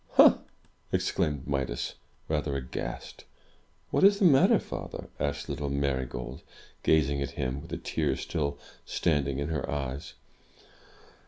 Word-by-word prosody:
"Ha!" - - +8 0.5
exclaimed 70 -3 0
Midas, 65 -4 -1 0.3
rather 75 -2 0
aghast. 65 -2 -5 0.7
What - - +2
is 200 +1 +7
the 200 - +3
matter, 135 -6 +7
father?" - - -6
asked 70 0 -1
little 70 0 -3
Marygold, 65 -3 -2 0.4
gazing 70 -3 +3
at 70 - -1
him, 65 +2 -1
with - - -11
the - - -3
tears - - -1
still 70 -4 -2 0.3
standing 70 -4 0
in 70 +2 -2
her 75 -4 -2
eyes. 70 -1 -4
70 Hz, 130 wpm, -29 LUFS, 65-75 Hz, 0.7 s, Ha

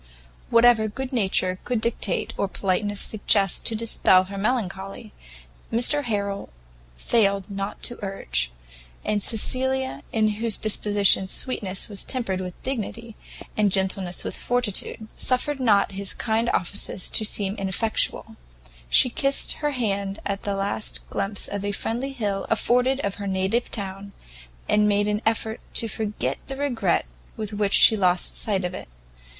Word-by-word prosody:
Whatever 230 -2 +5
good 260 +5 -6
nature 190 -4 +1
could 245 -2 -1
dictate 220 -4 -1
or 200 - -1
politeness 200 +2 -1
suggest 200 -2 +2
to 225 - -1
dispel 215 -4 +3
her 200 +1 -8
melancholy, 200 -2 -3 0.6
Mr 245 +6 +2
Harrel 200 -3 -2 0.5
failed 200 - +2
not 195 0 -5
to 240 - -2
urge; - - -2 0.5
and 210 -1 0
Cecilia, 260 +5 +2
in 215 -1 +2
whose 230 -3 +2
disposition 205 -2 +3
sweetness 195 -3 -1
was 205 -2 -4
tempered 195 -8 0
with 180 -1 -7
dignity, 230 -3 -4 0.4
and 210 -2 +2
gentleness 190 -1 +1
with - - -4
fortitude, 230 -2 -1
suffered 265 +3 0
not 210 -6 +3
his 195 0 -3
kind 225 +1 0
offices 185 +1 -1
to - - +2
seem 200 -2 0
ineffectual; 195 +3 0 0.5
she - - +6
kissed 275 +3 +1
her 295 - -1
hand 200 -7 -2
at 200 0 -2
the 200 -1 -2
last 200 +2 -3
glimpse 200 0 -2
a 205 0 -3
friendly 240 +7 -2
hill 205 -6 -2
afforded 250 +2 +2
of 200 +1 -3
her 200 - -3
native 190 +5 0
town, 200 -1 -4 0.5
and 210 0 +3
made 205 0 +2
an 210 0 0
effort 225 0 0 0.2
to 230 - +4
forget 215 0 -3
the 270 - -6
regret 280 -5 0 0.3
with 215 -1 -4
which 205 -1 +2
she 220 - +8
lost 180 -3 +2
sight 195 -4 +1
of 180 - -3
it. - - -8
210 Hz, 145 wpm, -24 LUFS, 195-230 Hz, 0.6 s, she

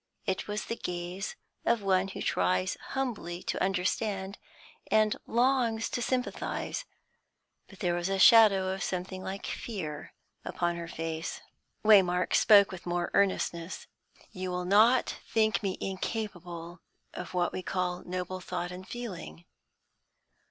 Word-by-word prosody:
It 190 - -1
was 210 0 -3
the 230 - -3
gaze 180 0 -4 0.3
of 230 -3 +2
one 190 -1 +2
who 195 - -6
tries 90 +1 +1 0.2
humbly 205 -10 -3
to - - -2
understand, 195 +1 -1 0.5
and 215 -1 +4
longs 235 -2 +2
to 245 - -2
sympathise. 255 - -2 0.8
But 195 - -15
there 175 -3 +1
was 175 +1 -1
a 195 - 0
shadow 195 -2 +7
of 190 - -6
something 185 +1 -3
like 195 +1 -5
fear 160 -10 -5 0.3
upon 175 0 -1
her 170 0 -5
face. 165 -1 -4 0.4
Waymark 180 -4 +5
spoke 200 -2 +7
with 185 -1 -9
more 175 0 -1
earnestness. 185 -3 0 0.5
"You 185 -2 -4
will 180 0 -2
not 220 +7 +4
think 220 -1 +2
me 195 -3 -2
incapable 180 -4 -5 0.3
of 180 0 -7
what 175 -1 +1
we - - -3
call 180 -1 -2
noble 185 +1 -4
thought 180 -1 -4
and 185 +1 -9
feeling? 180 - -7
185 Hz, 135 wpm, -30 LUFS, 175-210 Hz, 0.8 s, shadow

